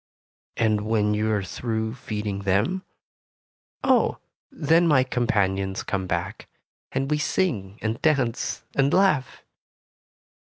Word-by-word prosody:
"And 110 -2 +2
when 105 -2 +2
you 110 +1 0
are 105 -2 0
through 110 +4 -3
feeding 105 -5 -4
them?" 105 - 0 1.0
"Oh, - - +3 0.3
then 165 - +3
my 140 -5 +5
companions 100 -6 0
come 95 -1 -2
back, - - -3 0.4
and 135 +2 -1
we 150 - +2
sing 115 - -1
and 110 +1 -2
dance 130 -7 0
and 140 0 +3
laugh." 180 -9 +2
115 Hz, 115 wpm, -25 LUFS, 105-140 Hz, 1.0 s, my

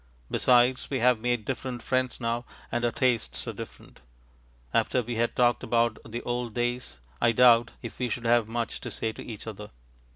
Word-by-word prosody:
Besides, 125 0 +3
we 135 - -1
have 125 -1 +3
made 120 -2 -1
different 130 -1 -4
friends 130 -1 0
now, 120 0 -1 0.3
and 120 - -1
our 120 - +2
tastes 120 -2 0
are - - -3
different. - - -11 0.7
After 125 - +2
we 120 0 -4
had 120 +1 0
talked 120 -1 +3
about 115 -1 +1
the 120 +2 -6
old 120 -2 -3
days, 120 - -2 0.2
I 120 -1 +4
doubt 120 0 +5
if 115 - -8
we 125 -1 -1
should 120 +1 -4
have 115 -1 +3
much 115 +1 -3
to - - -5
say 110 - -3
to - - -9
each 110 -3 -8
other. 105 -1 -7
120 Hz, 190 wpm, -27 LUFS, 115-125 Hz, 0.7 s, doubt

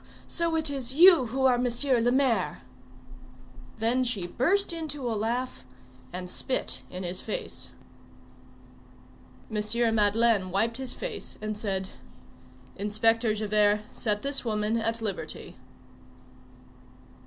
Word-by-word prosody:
so 335 -1 0
it 320 0 +1
is 270 -3 -1
you 335 -5 +7
who 265 +4 -1
are 250 -2 +4
M. - - +2 0.2
le 245 -4 +2
Maire!" 245 - +1 1.1
Then 235 +4 +1
she 230 -7 -1
burst 345 - +1
into 300 -5 -4
a 235 - -1
laugh, 235 +4 -3 0.5
and 180 0 -5
spit 255 +7 -1
in 180 +1 -6
his 180 +1 -1
face. - - -3 1.8
M. 220 +2 +2
Madeleine 210 -2 +3
wiped 220 +5 0
his 260 -1 -2
face, - - -5
and 215 0 -4
said:— 195 -3 -2 0.9
"Inspector 220 +3 +2
Javert, 210 0 +2
set 210 -3 -1
this 280 0 -1
woman 215 -1 0
at 225 0 -2
liberty." 195 -7 -4
230 Hz, 120 wpm, -27 LUFS, 210-260 Hz, 1.8 s, you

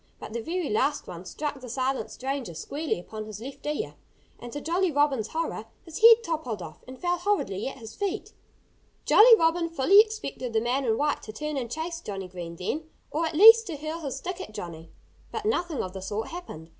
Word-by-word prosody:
But - - -8
the 235 - -2
very 340 +5 -2
last 275 +7 +1
one 175 +1 -8
struck 290 +6 -4
the 250 - -8
silent 260 +2 -1
stranger 265 - -4
squarely 290 - -3
upon 215 +4 -7
his 215 -1 -8
left 270 +4 -9
ear. 300 +10 -2 0.5
And 240 - -8
to 290 - -4
Jolly 345 +4 +1
Robin's 280 -6 +2
horror, 315 -8 -3 0.2
his 330 -2 -7
head 460 0 +9
toppled 305 - -3
off 160 -3 -10
and 255 0 -10
fell 355 0 0
horridly 345 - 0
at 270 - -6
his 225 -3 -10
feet. 405 0 -3 0.7
Jolly 455 +2 +8
Robin 335 0 +2
fully 330 +6 +5
expected 425 - 0
the 220 - +3
man 250 +4 0
in 225 -2 +2
white 295 0 0
to 215 - -8
turn 300 +7 -4
and 250 -4 -3
chase 330 +5 -4
Johnnie 195 - -6
Green 175 -2 -7
then 305 - -4 0.2
or 325 +2 0
at 315 - -5
least 450 +5 +9
to 325 -5 -4
hurl 310 +3 -5
his 275 -5 -4
stick 365 +6 -5
at 215 - -9
Johnnie. 165 -2 -7 0.4
But 435 -1 -4
nothing 350 - 0
of 185 - -6
the 190 - -6
sort 205 +3 -3
happened. 170 - -8
285 Hz, 210 wpm, -27 LUFS, 220-335 Hz, 0.7 s, head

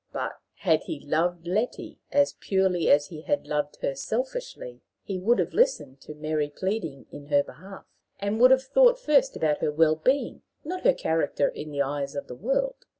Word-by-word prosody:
But, - - -3 0.2
had - - +1
he 320 - -5
loved 165 +3 -1
Letty 210 +8 -2
as 285 0 +3
purely 190 -3 +1
as 145 0 +4
he 155 -3 -9
had 290 - -1
loved 150 -1 -2
her 140 - 0
selfishly, 485 - -4 0.2
he 195 -3 -4
would 230 +6 +3
have - - -1
listened 420 - +1
to 150 - -10
Mary 155 -1 -2
pleading 165 -4 -4
in 145 0 -10
her 145 -1 +3
behalf, 190 +7 -12 0.3
and 200 +2 -2
would 250 +1 +8
have 260 0 +5
thought - - +5
first 280 - +2
about 150 -2 0
her - - 0
well 155 +1 +3
being, 260 - 0 0.2
not 365 +4 -4
about - - +4
her - - -13
character 160 -3 0
in 155 - -7
the 140 -1 0
eyes 140 0 -4
of 140 - -4
the - - -9
world. 270 - -2
180 Hz, 195 wpm, -26 LUFS, -, 0.3 s, would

